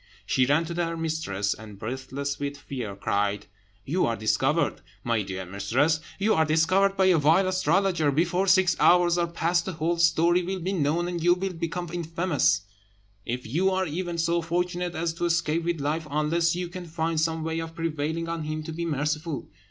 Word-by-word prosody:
She 130 Hz, -1 st, +2 dB
ran 150 Hz, +4 st, +3 dB
to 170 Hz, -, -5 dB
her 165 Hz, -1 st, -2 dB
mistress, 155 Hz, -12 st, -1 dB
and, 105 Hz, -2 st, -11 dB
breathless 130 Hz, +5 st, -4 dB
with 140 Hz, 0 st, -3 dB
fear, 125 Hz, -8 st, -6 dB
cried, 100 Hz, +1 st, -1 dB, 0.4 s
"You 175 Hz, +7 st, +1 dB
are 115 Hz, -, 0 dB
discovered, 135 Hz, +9 st, +1 dB, 0.2 s
my 115 Hz, -2 st, +1 dB
dear 95 Hz, -1 st, -5 dB
mistress, 115 Hz, -, +1 dB, 0.2 s
you 210 Hz, +3 st, +2 dB
are 160 Hz, -, +3 dB
discovered 185 Hz, +6 st, +2 dB
by 190 Hz, -, +4 dB
a 180 Hz, -3 st, +5 dB
vile 165 Hz, +6 st, +4 dB
astrologer. 185 Hz, -3 st, +2 dB
Before 175 Hz, +6 st, +1 dB
six 190 Hz, -2 st, +4 dB
hours 175 Hz, 0 st, +5 dB
are 170 Hz, -, +1 dB
past 170 Hz, +1 st, 0 dB
the 190 Hz, -, -3 dB
whole 165 Hz, +2 st, -1 dB
story 170 Hz, +1 st, +4 dB
will 190 Hz, +2 st, -3 dB
be 185 Hz, +3 st, -2 dB
known, 165 Hz, +1 st, +1 dB
and 175 Hz, -1 st, -3 dB
you 175 Hz, 0 st, +5 dB
will 190 Hz, +1 st, -3 dB
become 170 Hz, 0 st, -4 dB
infamous, 165 Hz, -, +1 dB, 0.7 s
if 125 Hz, +2 st, -3 dB
you 170 Hz, +12 st, +1 dB
are 190 Hz, 0 st, 0 dB
even 175 Hz, +2 st, -3 dB
so 170 Hz, +1 st, +1 dB
fortunate 175 Hz, +1 st, -2 dB
as 165 Hz, +1 st, -1 dB
to 170 Hz, +1 st, -2 dB
escape 170 Hz, -1 st, +1 dB
with 170 Hz, -2 st, -1 dB
life, 150 Hz, +3 st, -2 dB
unless 165 Hz, +3 st, +1 dB
you 180 Hz, 0 st, -3 dB
can 175 Hz, 0 st, -8 dB
find 160 Hz, -1 st, -1 dB
some 160 Hz, 0 st, 0 dB
way 160 Hz, 0 st, -2 dB
of 165 Hz, 0 st, -6 dB
prevailing 165 Hz, 0 st, -2 dB
on 165 Hz, -2 st, -3 dB
him 155 Hz, 0 st, -3 dB
to 160 Hz, -, -6 dB
be 170 Hz, +1 st, -3 dB
merciful." 150 Hz, 0 st, -2 dB
165 Hz, 190 wpm, -26 LUFS, 145-175 Hz, 0.7 s, a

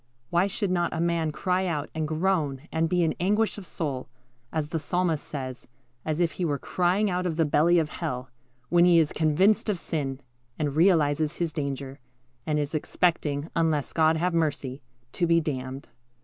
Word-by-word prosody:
Why 175 Hz, +3 st, +3 dB
should 200 Hz, -1 st, -2 dB
not 175 Hz, -1 st, +1 dB
a -, -, -2 dB
man 170 Hz, -2 st, +1 dB
cry 185 Hz, +4 st, 0 dB
out, 150 Hz, -4 st, -2 dB
and 160 Hz, -1 st, -2 dB
groan, 155 Hz, -4 st, 0 dB
and 160 Hz, 0 st, +1 dB
be 180 Hz, 0 st, +2 dB
in 160 Hz, -, +1 dB
anguish 210 Hz, +4 st, +1 dB
of 190 Hz, -, -11 dB
soul, 140 Hz, -6 st, -4 dB, 0.4 s
as 155 Hz, -2 st, -2 dB
the 165 Hz, -, -1 dB
Psalmist 170 Hz, 0 st, 0 dB
says, 130 Hz, -4 st, -6 dB, 0.4 s
as 155 Hz, +1 st, -2 dB
if 170 Hz, -1 st, +2 dB
he 185 Hz, -, -4 dB
were 145 Hz, -4 st, 0 dB
crying 180 Hz, +8 st, +1 dB
out 180 Hz, 0 st, 0 dB
of 165 Hz, -, -2 dB
the 165 Hz, -, +3 dB
belly 155 Hz, +4 st, +4 dB
of 160 Hz, -3 st, +1 dB
hell, 125 Hz, -2 st, -4 dB, 0.4 s
when 175 Hz, 0 st, +5 dB
he 175 Hz, -1 st, +6 dB
is 160 Hz, -2 st, +3 dB
convinced 185 Hz, +8 st, +3 dB
of 205 Hz, -, +1 dB
sin, 140 Hz, -6 st, -3 dB, 0.4 s
and 145 Hz, -2 st, -1 dB
realizes 155 Hz, -3 st, +3 dB
his 170 Hz, -3 st, -1 dB
danger, 140 Hz, -2 st, -4 dB, 0.5 s
and 150 Hz, -1 st, +1 dB
is 145 Hz, 0 st, -2 dB
expecting, 155 Hz, -1 st, 0 dB
unless 160 Hz, -4 st, +1 dB
God 160 Hz, 0 st, +3 dB
have 175 Hz, +2 st, 0 dB
mercy, 145 Hz, -5 st, -1 dB, 0.3 s
to 175 Hz, -, 0 dB
be 165 Hz, 0 st, +5 dB
damned? 135 Hz, -3 st, -4 dB
160 Hz, 185 wpm, -26 LUFS, 145-175 Hz, 0.5 s, he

